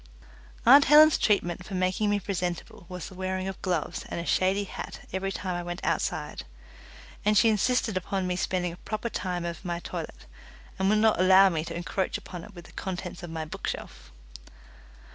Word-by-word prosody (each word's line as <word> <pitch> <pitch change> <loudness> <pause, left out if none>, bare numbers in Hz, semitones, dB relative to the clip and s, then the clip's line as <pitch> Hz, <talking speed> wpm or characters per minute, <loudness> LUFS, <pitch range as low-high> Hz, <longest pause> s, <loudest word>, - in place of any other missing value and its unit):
Aunt 275 +4 +9
Helen's 305 +2 +7
treatment 180 -4 +1
for 195 - -7
making 185 +3 +1
me 205 0 +2
presentable 180 -3 -4
was 180 -3 -6
the - - -11
wearing 185 0 -3
of 195 - -6
gloves 175 -5 -2
and - - -3
a 170 - -4
shady 190 +3 +2
hat 200 - -7
every 190 +1 -1
time 185 -1 -3
I 175 - -2
went 175 +1 -5
outside; - - -2 0.8
and 210 0 +3
she 225 - +6
insisted 220 0 +1
upon 185 +1 -2
me 180 0 -1
spending 180 -1 -1
a - - -11
proper 215 +4 -4
time 180 -5 -3
over 170 -1 -4
my 175 -2 -2
toilet, - - -7 0.5
and 190 0 +2
would 215 - +4
not 220 -2 +3
allow 190 +1 +7
me 160 -3 -1
to - - -6
encroach 185 +2 -2
upon 175 -2 -9
it 205 - -13
with 175 0 -11
the - - -14
contents 180 -1 -5
of 175 - -7
my 160 -1 -4
bookshelf. 65 - -6
185 Hz, 190 wpm, -27 LUFS, 175-205 Hz, 0.8 s, Aunt